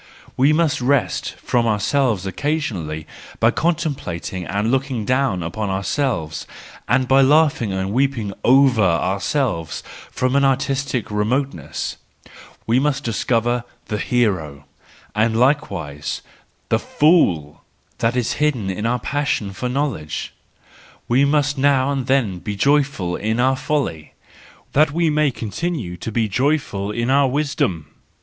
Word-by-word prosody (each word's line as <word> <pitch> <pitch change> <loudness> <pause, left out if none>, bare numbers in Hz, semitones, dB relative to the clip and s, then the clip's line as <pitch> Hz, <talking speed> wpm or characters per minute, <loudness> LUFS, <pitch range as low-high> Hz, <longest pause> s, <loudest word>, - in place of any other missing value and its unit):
We 135 +4 +4
must 155 -4 +2
rest 135 +1 0
from 120 -1 0
ourselves 110 -1 +1
occasionally 95 - -2 0.3
by - - +4
contemplating 140 - -2
and 105 +3 0
looking 130 -4 -1
down 130 -8 +1
upon 100 +5 -3
ourselves, 95 - -2 0.4
and 130 -1 +2
by 135 +1 +5
laughing 145 -5 +3
or 95 0 -2
weeping 115 -2 0
over 130 -2 +5
ourselves 95 - 0 0.3
from 130 +1 -1
an 140 - +4
artistic 135 -2 0
remote¬ 120 +7 0
ness: 80 - -5 0.7
we 120 +3 +3
must 140 0 0
discover 120 +1 0 0.3
the 105 -2 -2
hero> 90 - 0 0.5
and 110 +1 +1
likewise 80 - -1 0.5
the - - +2
fool, 90 - +2 0.4
that 115 +1 +1
is 125 -2 0
hidden 125 -11 +1
in 105 +4 -2
our 125 +1 +1
passion 130 -6 -2
for 125 +6 -3
knowledge; 125 - -3 0.7
we 130 +4 +4
must 145 -1 +1
now 140 -1 +3
and 135 -3 -2
then 115 -9 +1
be 105 +3 -5
joyful 135 -7 +1
in 110 +3 -1
our 130 +2 +3
folly, 130 - -2 0.6
that 150 +2 +4
we 165 +1 +1
may 150 -1 +3
continue 115 - -4
to 100 +6 -6
be 115 0 +1
joyful 125 -4 0
in 120 +4 -1
our 140 0 +4
wisdom! 130 - -1
125 Hz, 130 wpm, -20 LUFS, 100-140 Hz, 0.7 s, by